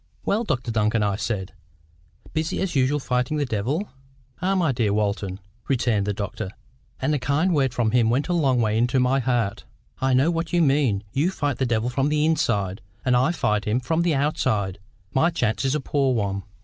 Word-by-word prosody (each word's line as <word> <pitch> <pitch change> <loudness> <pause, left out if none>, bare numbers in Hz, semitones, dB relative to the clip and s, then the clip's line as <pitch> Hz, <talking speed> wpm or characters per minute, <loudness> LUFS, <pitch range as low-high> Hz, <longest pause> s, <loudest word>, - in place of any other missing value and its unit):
"Well, 215 +4 +1
Dr 125 - -2
Duncan," 110 0 +1
I 100 -1 +1
said, 95 -3 -3 0.8
"busy 160 +1 -1
as 190 -4 -2
usual 135 +2 +2
fighting 125 +2 -1
the 145 - 0
devil." 130 - -1 0.5
"Ah, 190 +2 +1
my 170 -6 +2
dear 115 -4 0
Mr - - +1
Walton," 100 -2 -1 0.3
returned 115 -6 +1
the - - +1
doctor—and 100 - -5
a 145 - +1
kind 145 +8 +1
word 135 -4 +2
from 120 -3 0
him 120 -2 +3
went 130 +5 +1
a 180 - 0
long 135 -7 +2
way 110 -1 +1
into 125 +2 +2
my 130 +2 +2
heart—"I 125 +2 -2
know 140 +6 +3
what 165 0 -3
you 175 -1 +4
mean. 135 -8 +2
You 145 +6 +2
fight 145 -7 -2
the 130 - +1
devil 120 +1 0
from 135 +3 +1
the 150 0 +2
inside, 105 - 0 0.2
and 125 -1 +3
I 130 +6 +3
fight 105 -11 0
him 110 +4 +1
from 160 +6 0
the 170 -3 +2
outside. 130 - 0 0.3
My 160 +6 +3
chance 125 -6 -1
is 135 +2 +1
a - - +1
poor 135 -2 +1
one." 100 -3 -2
130 Hz, 200 wpm, -24 LUFS, 110-150 Hz, 0.8 s, you